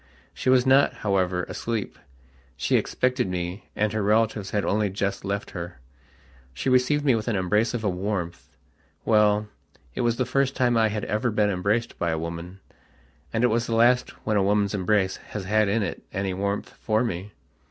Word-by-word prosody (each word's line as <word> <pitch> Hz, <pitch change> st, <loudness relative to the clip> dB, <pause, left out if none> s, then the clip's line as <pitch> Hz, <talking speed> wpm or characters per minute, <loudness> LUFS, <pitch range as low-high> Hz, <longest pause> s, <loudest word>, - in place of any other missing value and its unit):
She -, -, -2 dB
was 130 Hz, -1 st, +5 dB
not, 135 Hz, +2 st, +4 dB
however, 90 Hz, -3 st, +1 dB
asleep. 115 Hz, +1 st, -4 dB, 0.6 s
She -, -, +1 dB
expected 125 Hz, -4 st, 0 dB
me, 90 Hz, +2 st, -4 dB
and 105 Hz, 0 st, 0 dB
her 110 Hz, -, 0 dB
relatives 105 Hz, -1 st, +1 dB
had 105 Hz, -1 st, -1 dB
only 105 Hz, 0 st, +1 dB
just 100 Hz, +1 st, -2 dB
left 100 Hz, +1 st, -3 dB
her. 85 Hz, -5 st, -7 dB, 0.8 s
She 130 Hz, -, -1 dB
received 135 Hz, +4 st, +3 dB
me 135 Hz, -, +5 dB
with 110 Hz, -1 st, -2 dB
an 115 Hz, -, 0 dB
embrace 105 Hz, +5 st, +1 dB
of 115 Hz, -, -3 dB
a -, -, +1 dB
warmth.... 90 Hz, -6 st, -4 dB, 0.5 s
Well, 105 Hz, -1 st, +3 dB, 0.5 s
it -, -, -2 dB
was 120 Hz, -1 st, +2 dB
the 130 Hz, -, 0 dB
first 135 Hz, +2 st, 0 dB
time 125 Hz, -2 st, +2 dB
I 110 Hz, -1 st, +4 dB
had 105 Hz, 0 st, -3 dB
ever 105 Hz, +4 st, 0 dB
been 105 Hz, -2 st, +2 dB
embraced 100 Hz, +5 st, -1 dB
by 85 Hz, -, 0 dB
a 80 Hz, -, 0 dB
womanand 85 Hz, +3 st, -6 dB, 0.9 s
it 125 Hz, -, +4 dB
was 115 Hz, +1 st, 0 dB
the 115 Hz, -, 0 dB
last 125 Hz, +2 st, +4 dB, 0.2 s
when 110 Hz, -2 st, +1 dB
a 100 Hz, -, +3 dB
woman's 100 Hz, 0 st, +2 dB
embrace 95 Hz, -1 st, +1 dB
has 105 Hz, -, -7 dB
had 105 Hz, +2 st, +2 dB
in 105 Hz, +2 st, +1 dB
it -, -, -4 dB
any 95 Hz, 0 st, -2 dB
warmth 100 Hz, +2 st, -2 dB
for 110 Hz, +2 st, +1 dB
me.... 100 Hz, -2 st, -4 dB
105 Hz, 185 wpm, -25 LUFS, 95-115 Hz, 0.9 s, was